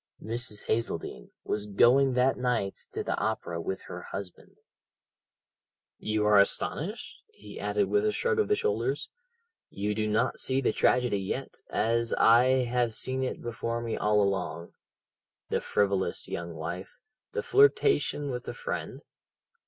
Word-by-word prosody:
Mrs. 115 Hz, -2 st, -3 dB
Hazeldene 110 Hz, -, -2 dB
was 105 Hz, 0 st, -2 dB
going 125 Hz, +6 st, +4 dB
that 125 Hz, +1 st, +3 dB
night 120 Hz, -6 st, -2 dB
to -, -, -3 dB
the -, -, -1 dB
opera 85 Hz, -6 st, -2 dB
with 95 Hz, +3 st, -4 dB
her -, -, -8 dB
husband 95 Hz, -3 st, -8 dB, 1.4 s
"You 110 Hz, 0 st, 0 dB
are 105 Hz, -1 st, +6 dB
astonished?" 160 Hz, -, -1 dB
he 440 Hz, -, -12 dB
added 410 Hz, -1 st, 0 dB
with 415 Hz, +1 st, +2 dB
a -, -, +2 dB
shrug 470 Hz, 0 st, 0 dB
of 430 Hz, -, +2 dB
the 420 Hz, -, +3 dB
shoulders, 445 Hz, +1 st, -1 dB, 0.6 s
"you 105 Hz, +1 st, -2 dB
do 110 Hz, 0 st, -1 dB
not 110 Hz, +4 st, 0 dB
see 130 Hz, 0 st, +1 dB
the 135 Hz, -, +1 dB
tragedy 125 Hz, -5 st, +2 dB
yet, 95 Hz, -, -5 dB
as 115 Hz, +1 st, 0 dB
I 125 Hz, +3 st, +5 dB
have 120 Hz, -2 st, 0 dB
seen 130 Hz, +2 st, -2 dB
it 130 Hz, -, -4 dB
before 115 Hz, 0 st, -3 dB
me 115 Hz, -1 st, -3 dB
all 105 Hz, 0 st, +2 dB
along. 90 Hz, -3 st, -2 dB, 0.8 s
The -, -, 0 dB
frivolous 100 Hz, -2 st, 0 dB
young 85 Hz, -1 st, -5 dB
wife, 85 Hz, +5 st, -6 dB, 0.4 s
the 460 Hz, -, -2 dB
flirtation 410 Hz, -, +3 dB
with 125 Hz, -1 st, -5 dB
the -, -, -6 dB
friend? -, -, -5 dB
115 Hz, 145 wpm, -28 LUFS, 100-130 Hz, 1.4 s, are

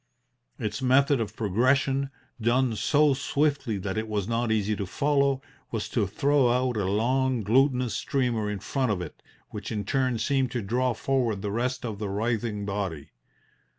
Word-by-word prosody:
Its 105 Hz, +1 st, -3 dB
method 135 Hz, +1 st, +4 dB
of 105 Hz, -1 st, -4 dB
progression 130 Hz, +6 st, +1 dB, 0.3 s
done 120 Hz, +1 st, +2 dB
so 145 Hz, +5 st, +3 dB
swiftly 140 Hz, -4 st, 0 dB
that 95 Hz, +2 st, -2 dB
it 110 Hz, -, -4 dB
was 105 Hz, -3 st, -2 dB
not 115 Hz, 0 st, 0 dB
easy 105 Hz, -1 st, +1 dB
to 100 Hz, -2 st, -4 dB
follow 140 Hz, +2 st, +1 dB, 0.3 s
was 110 Hz, -3 st, -3 dB
to 105 Hz, -4 st, 0 dB
throw 135 Hz, +6 st, +2 dB
out 125 Hz, 0 st, +1 dB
a 105 Hz, -3 st, 0 dB
long, 125 Hz, +4 st, +1 dB
glutinous 125 Hz, +2 st, +2 dB
streamer 120 Hz, -6 st, 0 dB
in 105 Hz, -, -2 dB
front 125 Hz, +5 st, -1 dB
of 100 Hz, -, -1 dB
it, 90 Hz, -4 st, -8 dB, 0.3 s
which 105 Hz, +1 st, -6 dB
in 105 Hz, -3 st, -3 dB
turn 130 Hz, 0 st, +1 dB
seemed 135 Hz, +1 st, +1 dB
to 120 Hz, -2 st, -3 dB
draw 125 Hz, +4 st, 0 dB
forward 120 Hz, -7 st, 0 dB
the 100 Hz, -, -2 dB
rest 125 Hz, +3 st, -1 dB
of 110 Hz, -4 st, -4 dB
the 105 Hz, -2 st, -3 dB
writhing 110 Hz, 0 st, -1 dB
body. 100 Hz, -7 st, -4 dB
120 Hz, 170 wpm, -27 LUFS, 105-130 Hz, 0.3 s, method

